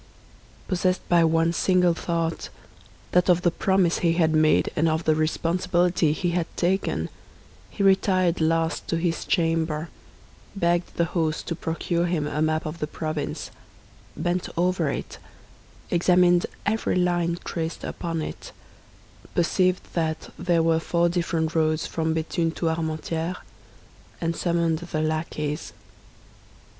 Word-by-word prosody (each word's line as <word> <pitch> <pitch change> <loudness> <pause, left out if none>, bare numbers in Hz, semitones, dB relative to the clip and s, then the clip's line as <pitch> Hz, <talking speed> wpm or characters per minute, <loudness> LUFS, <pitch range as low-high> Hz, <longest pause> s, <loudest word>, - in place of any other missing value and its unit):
Possessed 185 0 0
by 175 -1 +5
one 165 +1 +2
single 180 -1 +3
thought—that 170 +1 -3
of 180 0 +4
the 175 - +3
promise 190 -2 +2
he 170 -1 +2
had 160 -2 +2
made, 155 0 +3
and 160 +1 +2
of 160 +1 0
the 155 - +3
responsibility 170 +1 +1
he 175 +3 -1
had 170 -1 0
taken—he 190 +2 -3
retired 185 -3 +3
last 165 +1 +1
to 165 - 0
his 165 -1 -1
chamber, 165 -2 0 0.7
begged 175 -2 0
the 170 - +2
host 160 -3 0
to 170 - -1
procure 170 +1 -1
him 165 -4 0
a 150 +1 -2
map 155 0 +1
of 155 +2 -5
the 150 - -2
province, 155 -1 -4 0.7
bent 175 +1 -1
over 175 -3 +1
it, - - -5 0.7
examined 175 0 +4 0.2
every 220 +2 0
line 175 -1 +1
traced 165 -1 -4
upon 165 -2 -3
it, - - -8 0.8
perceived 180 +1 +2
that 160 -2 -2
there 175 -2 +1
were 165 0 +3
four 170 +1 +1
different 165 -2 -1
roads 155 -1 +1
from 160 -1 -1
Béthune 165 0 -1
to 165 - 0
Armentières, 160 +2 -2 0.8
and 165 0 -1
summoned 170 -2 +1
the 170 -3 -3
lackeys. 155 -1 -3
170 Hz, 130 wpm, -25 LUFS, 160-175 Hz, 0.8 s, by